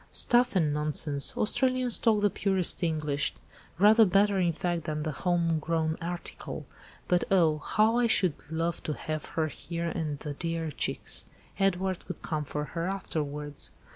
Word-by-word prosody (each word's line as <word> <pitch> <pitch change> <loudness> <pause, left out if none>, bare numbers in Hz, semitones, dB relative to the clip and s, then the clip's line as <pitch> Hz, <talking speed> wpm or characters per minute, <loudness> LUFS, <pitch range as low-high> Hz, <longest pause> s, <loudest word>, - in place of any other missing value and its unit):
"Stuff 240 -2 +3
and 155 -5 +2
nonsense! 150 -1 0
Australians 255 +2 +2
talk 220 -3 +3
the 205 -1 +3
purest 190 -3 +1
English; 150 -4 0 0.4
rather 215 +4 +7
better, 200 0 +3
in 175 -2 +3
fact, 170 0 -2
than 155 -1 -2
the 155 - -2
home 170 0 +1
grown 160 0 0
article. 175 +1 -6 0.4
But 180 -1 +3
oh! 165 -5 +4
how 220 +9 +2
I 240 - +3
should 185 -7 +4 0.2
love 165 +1 -1
to 155 - -3
have 155 -1 -4
her 160 - +3
here 170 +2 -4
and 155 -4 -3
the 150 0 -5
dear 165 +1 -3
chicks. - - -3 0.3
Edward 190 -1 +1
could - - -7
come 150 -2 -2
for 150 +1 -3
her 165 +1 -2
afterwards." 150 -6 -3
170 Hz, 160 wpm, -29 LUFS, 155-195 Hz, 0.4 s, rather